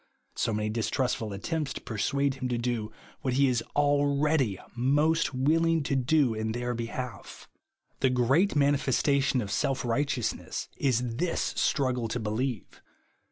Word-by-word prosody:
— - - -44
SO - - 0
many 105 0 -1
distrustful 115 0 -1
attempts 145 - -3
to - - -7
p - - -7
ersuade 140 +6 +1
him 130 -1 -4
to 120 - 0
do 120 -3 -2 0.3
what 130 -2 -1
he 140 +1 +4
is 125 -3 +1
already 145 -5 +2 0.2
most 145 +6 +2
willing 160 +4 +2
to 140 - -1
do 135 -1 +3
in 110 0 -2
their 120 +1 -2
behalf. 120 -1 -6 0.5
The 130 - +3
great 130 +10 +2
manifestation 140 -1 +2
of 100 -3 -5
self 135 +5 0
righteous 125 0 0
ness, - - -6
is 125 -3 0
this 175 +1 -1
struggle 125 -4 +1
to 115 +2 -3
believe. 110 +1 -3
130 Hz, 155 wpm, -28 LUFS, 115-140 Hz, 0.5 s, he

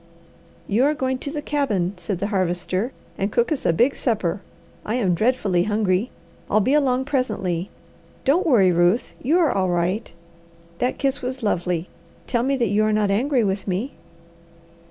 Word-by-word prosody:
"You 220 +6 +2
are 300 +1 +2
going 260 -2 -1
to 280 - -4
the 295 -1 -4
cabin," 215 -13 0
said 180 +1 -4
the 200 +4 -2
Harvester, 185 +4 -1 0.3
"and 200 +1 0
cook 235 +5 +1
us 300 - -1
a - - +5
big 240 +12 +2
supper. 200 -6 -1 0.4
I 220 - -2
am 200 -8 +1
dreadfully 200 -3 +1
hungry. 210 +1 +1 0.4
I'll 215 - +4
be 255 +7 +2
along 265 -3 +2
presently. 205 - -1 0.6
Don't 335 +7 +3
worry, 200 - +5
Ruth, 175 +7 +2
you 300 +7 +2
are 335 -4 +3
all 185 -1 0
right! 180 +5 -1 0.7
That 250 - 0
kiss 275 0 -1
was 255 -1 -4
lovely. 180 -3 -1 0.4
Tell 235 - 0
me 275 +3 +1
that 235 -5 +1
you 210 +2 +2
are 215 - +2
not 210 -2 +2
angry 250 +4 +2
with 195 0 -2
me." 200 +9 -2
215 Hz, 175 wpm, -22 LUFS, 185-260 Hz, 0.7 s, a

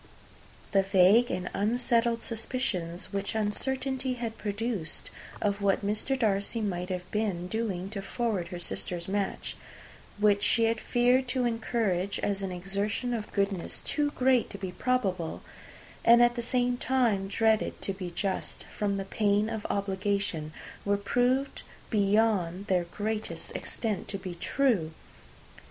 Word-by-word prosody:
The 195 - +5
vague 195 +5 +5
and 180 0 -2
unsettled 235 +2 +1
suspicions 215 -7 -3
which 200 +2 -2
uncertainty 260 +4 0
had 230 -2 -4
produced, 205 -5 -3 0.3
of 200 0 0
what 200 0 +2
Mr. 215 +6 0
Darcy 210 -1 0
might 180 -4 -2
have 180 -1 -4
been 200 -5 -1
doing 195 -3 -2
to 200 -2 -4
forward 205 -4 -1
her 175 - -6
sister's 175 0 -4
match 200 0 -2 0.6
which 205 -1 +4
she 230 +2 +3
had 225 0 +2
feared 250 +2 +3
to 250 0 0
encourage, 225 -5 0
as 200 -1 0
an 190 -1 -3
exertion 200 +6 -2
of 220 -3 -4
goodness 200 -3 -1
too 295 -1 0
great 255 -2 +3
to 200 - -7
be 190 -2 -4
probable, 190 -7 -1 0.6
and 235 +1 +8
at 240 0 +5
the 240 - -3
same 245 +1 +1
time 235 -8 +1
dreaded 220 +2 +2
to 195 - 0
be 185 -2 -5
just, 190 +3 -3
from 200 -1 0
the 195 - -3
pain 205 +1 +2
of 220 -2 -4
obligation 200 -4 -1 0.3
were 200 0 +2
proved 245 +6 +1 0.3
beyond 200 -3 +2
their 185 -4 +1
greatest 210 +5 -4
extent 215 -5 -2
to 200 - -3
be 185 -2 -6
true! 190 - +1
205 Hz, 140 wpm, -29 LUFS, 195-235 Hz, 0.6 s, and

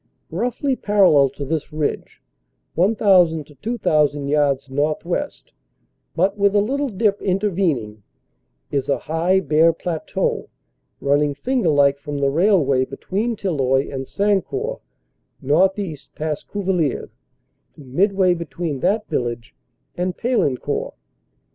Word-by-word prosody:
Roughly 245 - -1
parallel 190 - +4
to 140 +2 -7
this 155 +1 -3
ridge 150 -1 -3 0.5
1,000 180 -4 +3
to 150 - -17
2,000 150 - 0
yards 140 -2 +1
northwest, 155 - -2 0.6
but 195 +4 +1
with 200 0 +3
a - - +6
little 275 +7 0
dip 205 -1 0
intervening, 180 - -1 0.7
is 140 -1 -1
a 140 - +2
high 170 +4 +1
bare 160 0 +4
plateau 165 -1 -3 0.5
running 145 +1 +2
fmgerlike 145 - +2
from 145 0 -5
the 140 -1 +1
railway 155 -6 +3
between 200 - -3
Tilloy 135 -9 0
and 135 -1 -4
Sancourt 210 - -1 0.6
northeast 165 +1 0
past 155 -1 -4
Cuvillers 180 -8 -1 0.6
to - - -14
midway 185 +7 +2
between 170 -3 -4
that 210 +6 0
village 120 -1 -3 0.4
and 180 +1 -2
Paillencourt. 230 - -1
165 Hz, 110 wpm, -21 LUFS, 140-200 Hz, 0.7 s, a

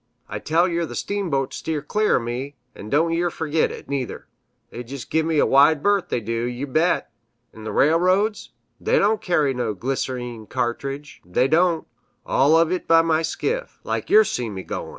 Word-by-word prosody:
I 105 - -5
tell 165 - +2
yer 170 -2 -1
th' - - -8
steamboats 170 -10 -2
steer 155 -3 -3
clear 210 +7 +1
o' - - +3
me, 125 +4 -5 0.2
an' 105 - -10
don' 160 +5 +2
yer 175 +1 +1
fergit 160 -1 0
it, - - -9
neither; 135 -3 -4 0.5
they 120 - -6
jist 130 +2 -9
give 160 0 +1
me 160 -2 0
a - - +4
wide 145 +2 +4
berth, 200 -2 +2
they - - 0
do, 115 +1 -2
yew 125 +3 -4
bet! 155 +6 +1 0.4
'n' 110 -1 -10
th' - - -3
railroads, 185 +8 +2 0.3
they - - +1
don' 215 +2 +3
carry 150 -6 +1
no 120 -4 -2
glyser_een_ 125 -1 -4
cartridge, 135 +3 -4
they 90 +9 +1
don't 165 +2 +2 0.4
all 140 +4 +3
uv 165 +1 +4
it 185 - -2
by 165 -1 +4
skiff, 485 - -3
like - - -3
yer 430 +2 +7
see 120 - -3
me 95 -2 -6
goin'." - - -5
150 Hz, 190 wpm, -22 LUFS, 125-170 Hz, 0.5 s, yer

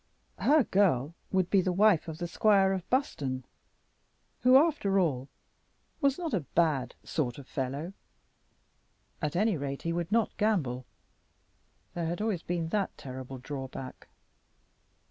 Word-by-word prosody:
Her 300 0 +5
girl 170 - +2 0.2
would 185 -2 +1
be 195 - +5
the 185 - 0
wife 195 -2 +4
of 160 -1 -5
the 175 0 -3
squire 195 +1 +3
of 185 -2 -5
Buston, 140 - -1 0.9
who, 255 +2 +7
after 275 -11 +2
all, 140 -7 0 0.7
was 275 -2 +3
not 335 -6 -4
a 200 - +2 0.2
bad 155 -6 +2
sort 125 -6 -2
of 140 -2 -11
fellow. 140 +7 -4 1.3
At 150 -1 -2
any 210 0 +2
rate 140 -1 -4
he 170 - -1
would 170 +2 -3
not 225 0 +1
gamble. 140 - 0 1.1
There 170 -2 -2
had 175 +3 -3
always 210 -5 -1
been 170 -2 -2
that 200 +1 -1
terrible 130 0 -7
drawback. 130 -1 -7
170 Hz, 140 wpm, -29 LUFS, 140-205 Hz, 1.3 s, who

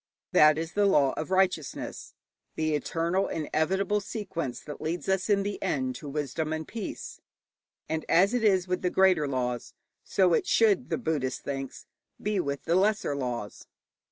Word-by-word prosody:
That 150 0 +6
is 165 +1 -4
the 205 -1 +3
law 140 -8 +4
of 155 - -4
righteousness, 185 -5 -1 0.4
the 155 -1 0
eternal 170 +5 0
inevitable 185 +6 0
sequence 180 - -4
that 150 - -9
leads 165 +3 -3
us 190 +1 0
in 200 -1 +3
the 205 0 -4
end 130 -9 -1
to 145 - -8
wisdom 150 +2 -2
and 160 0 -3
peace. 220 -3 -6 0.7
And 160 0 -2
as 195 +6 +4
it 245 -2 0
is 190 -4 +3
with 180 0 -1
the 180 - +1
greater 185 -5 +3
laws, 125 -3 -3 0.3
so 185 -3 +2
it - - +1
should, 220 0 +3
the - - 0
Buddhist 145 - -2
thinks, 135 -1 -5 0.3
be 210 -1 -1
with 140 -4 -2
the 165 - 0
lesser 200 -4 +2
laws. 120 -6 -4
165 Hz, 165 wpm, -28 LUFS, 145-195 Hz, 0.7 s, That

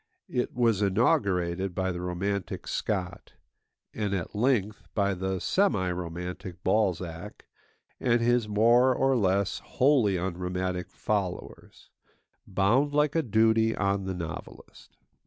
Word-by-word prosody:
It 125 - -2
was 115 -4 +2
inaugurated 95 -3 +1
by 95 0 0
the 90 0 -5
romantic 90 +2 -3
Scott; 95 -4 -3 0.6
and 105 -2 -2
at 90 -3 -4
length, 110 -3 +1
by 100 -2 +2
the 95 0 -2
semi 100 - +1
romantic 90 +1 -6
Balzac 90 -3 -1 0.5
and 120 -1 +2
his 120 -1 +2
more 120 +5 +4
or 135 +1 +2
less 100 -3 +1
wholly 125 -8 +2
unromantic 90 0 -3
followers, 100 -4 -4 0.6
bound 120 +10 +2
like 150 -1 +3
a 165 - +2
duty 110 -1 +2
on 100 0 0
the 95 -1 -3
novelist. 85 -3 -9
100 Hz, 120 wpm, -28 LUFS, 90-115 Hz, 0.6 s, more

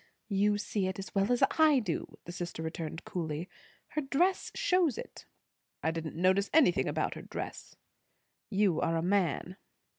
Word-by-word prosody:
"You 205 +1 +3
see 205 -2 -1
it 190 - -3
as 195 - -7
well 200 +3 +2
as 245 - +3 0.2
I 310 -3 +7
do," 205 -10 -3
the 175 - -6
sister 175 -2 -5
returned 160 +1 -5
coolly. 165 -1 -3 0.4
"Her 305 - -1
dress 335 +7 +1
shows 355 -8 +2
it." - - -9 0.6
"I 160 - +2
didn't 165 -1 -5
notice 185 +4 +3
anything 285 - +5
about - - 0
her - - -8
dress." - - -7 0.7
"You 195 -4 +2
are 165 - +1
a 165 - -1
man." 185 -1 0
190 Hz, 160 wpm, -31 LUFS, 170-225 Hz, 0.7 s, I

